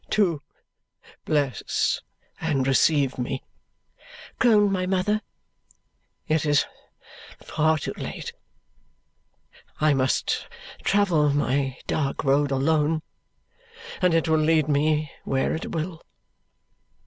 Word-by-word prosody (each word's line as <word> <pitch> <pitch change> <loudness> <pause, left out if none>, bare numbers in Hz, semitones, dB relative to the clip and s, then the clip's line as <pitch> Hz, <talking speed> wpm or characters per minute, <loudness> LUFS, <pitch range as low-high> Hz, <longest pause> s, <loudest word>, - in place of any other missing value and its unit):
"To 175 -8 +2 0.8
bless 140 -6 0 0.4
and 145 -5 0
receive 135 0 +2
me," 125 +2 -3 1.0
groaned 210 -4 +5
my 185 -1 -1
mother, 195 +3 +1 1.1
"it 155 0 +1
is 145 -2 +3 0.7
far 160 0 +1
too 145 - -4
late. - - -6 1.5
I 155 -1 +4
must 130 -1 0 0.4
travel 180 -7 +3
my 140 -2 0
dark 140 -3 -1
road 140 +1 +3
alone, 150 +3 +1 1.0
and 180 -2 +3
it 165 - +2
will 160 -1 +3
lead 155 -1 +3
me 150 0 +1
where 135 0 0
it 160 - -4
will. 165 +1 -4
155 Hz, 100 wpm, -25 LUFS, 140-165 Hz, 1.5 s, groaned